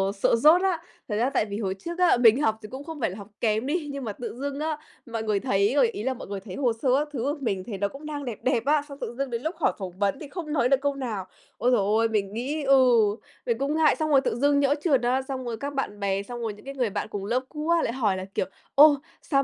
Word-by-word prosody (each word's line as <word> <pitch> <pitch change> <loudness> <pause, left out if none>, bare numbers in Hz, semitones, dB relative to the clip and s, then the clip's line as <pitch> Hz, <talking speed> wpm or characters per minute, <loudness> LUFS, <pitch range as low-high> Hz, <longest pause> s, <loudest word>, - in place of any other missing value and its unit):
sợ 195 - +3
dốt 310 +9 +6
á! 375 -4 +1 0.3
Thật 210 - -1
ra 240 +4 +2
tại 220 - +1
vì 200 0 -5
hồi 190 -4 -1
trước 340 - -6
á, 355 -7 +5
mình 240 +2 +6
học 220 -6 +2
thì 215 - -9
cũng 265 +2 -7
không 320 0 -8
phải 225 - +1
là 185 - -8
học 200 -1 -9
kém 220 +1 +1
đi, 300 +1 -1
nhưng 280 -1 -5
mà 215 -4 -4
tự 235 +1 -6
dưng 280 +1 -3
á, 310 0 -1 0.3
mọi 230 -3 -4
người 210 -2 +1
thấy 200 -1 +1
rồi 270 -4 +5
ý 210 - -5
là 265 +2 0
mọi 255 - -9
người 200 0 -4
thấy 190 -1 -9
hồ 250 -5 +1
sơ 265 - +1
các 300 - -1
thứ 265 - -3
của 285 +3 0
mình 195 -7 -1
thấy 205 0 -6
nó 200 +1 0
cũng 275 +8 -11
đang 295 -2 -5
đẹp 235 -5 -5
đẹp 245 -3 +1
á, 295 +1 +3
xong 280 - -8
tự - - -4
dưng 275 -1 -2
đến 235 -1 -3
lúc 320 +6 -3
hỏi - - +2
phỏng 190 -3 -5
vấn 200 +6 +1
thì 300 - -8
không 305 0 -5
nói 250 -4 +2
được 275 -1 +3
câu 285 0 0
nào. 230 -8 -4 0.3
Ối 250 - +2
giời 245 - +4
ôi, 220 +3 +2
mình 205 -2 -1
nghĩ 280 +6 -3
ừ, 270 -1 +6 0.6
mình 235 -2 0
cũng 280 +4 -1
ngại! 315 -1 +4
Xong 310 0 -1
rồi 275 -3 +5
tự 230 - -1
dưng 285 +3 +3
nhỡ 285 0 +3
trượt 275 -8 +3
á, 250 +2 +1
xong 265 -1 -5
rồi 230 -2 -3
các 280 +5 -5
bạn 240 -7 -3
bè 195 0 0
xong 240 +3 -7
rồi 225 -2 -2
những 210 +5 -16
cái 275 - -6
người 250 -4 0
bạn 205 +2 -3
cùng 205 -2 -5
lớp 235 +5 +1
cũ 305 +1 -5
á 340 -1 +4
lại 230 - -1
hỏi 215 -7 +1
là, 185 - -5
kiểu: - - +1 0.3
"Ồ! 295 +1 +8 0.3
Sao 275 -2 +1
255 Hz, 305 wpm, -26 LUFS, 215-285 Hz, 0.6 s, Ồ